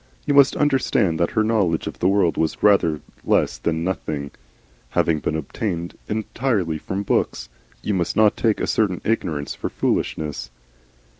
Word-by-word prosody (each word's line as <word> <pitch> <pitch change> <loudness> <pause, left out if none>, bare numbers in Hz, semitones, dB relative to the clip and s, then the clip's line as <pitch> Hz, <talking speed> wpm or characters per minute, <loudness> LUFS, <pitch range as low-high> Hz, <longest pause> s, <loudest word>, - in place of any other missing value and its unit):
You 145 - +1
must 140 -1 +6
understand 130 - +1
that 85 - +2
her 110 - +5
knowledge 100 -7 +1
of - - -6
the 90 - +2
world 95 -4 +3
was 80 - -1
rather 85 -7 +4 0.2
less - - +1
than 80 +5 -1
nothing, 75 -6 -3 0.7
having 80 -2 +3
been 75 - -2
obtained 85 +3 -3
entirely 105 - -1
from 95 +5 -4
books. - - -1 0.3
You 105 - -1
must 90 -3 -1
not 105 -1 +4
take 110 -3 +1
a - - 0
certain 100 -5 0
ignorance 80 -10 -1
for - - -4
foolishness. 75 -5 -2
90 Hz, 155 wpm, -22 LUFS, 80-110 Hz, 0.7 s, must